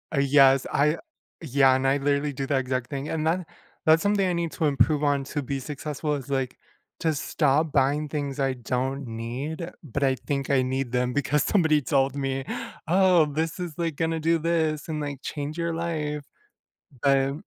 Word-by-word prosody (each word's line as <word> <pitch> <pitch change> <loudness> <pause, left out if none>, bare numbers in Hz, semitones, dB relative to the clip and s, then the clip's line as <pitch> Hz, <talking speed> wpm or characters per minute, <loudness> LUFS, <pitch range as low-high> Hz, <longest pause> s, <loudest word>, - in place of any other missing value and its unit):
Uh, - - +2
yes, 135 -1 +5
I 150 +3 +2 0.4
yeah 135 -3 +4
and 130 +1 +1
I 135 +1 +3
literally 145 +1 0
do 135 0 -3
the 140 -1 +1
exact 130 -1 -2
thing, 140 0 -4
and 155 -1 -2
then 170 +2 +1 0.4
that's 160 +1 +5
something 200 -2 +2
I 180 - 0
need 170 -1 -1
to 160 - -1
improve 145 +1 +2
on 145 -1 +2
to 145 +2 -3
be 135 +1 -3
successful 150 +2 -4
is, 140 -1 -7
like, 135 -2 -1 0.4
to 160 -1 +1
stop 150 +1 +1
buying 145 +2 +1
things 140 -1 -3
I 135 -1 +1
don't 130 +2 -3
need, 130 +9 -5
but 140 -1 -3
I 130 -1 +3
think 140 +1 -3
I 135 -2 +4
need 130 -1 -2
them 125 0 0
because 145 +1 +1
somebody 160 -7 +3
told 135 +1 +1
me, 135 -1 -2 0.4
"Oh, 180 -1 +5
this 160 +4 -2
is, 175 -3 -4
like, 165 -3 -1
gonna 165 0 0
do 165 +1 +2
this 160 -2 0
and, 155 -1 -2
like, 145 -2 -5
change 145 +3 -5
your 170 0 -1
life," 155 -3 -2 0.8
but 135 -1 +3
145 Hz, 190 wpm, -26 LUFS, 135-160 Hz, 0.8 s, yes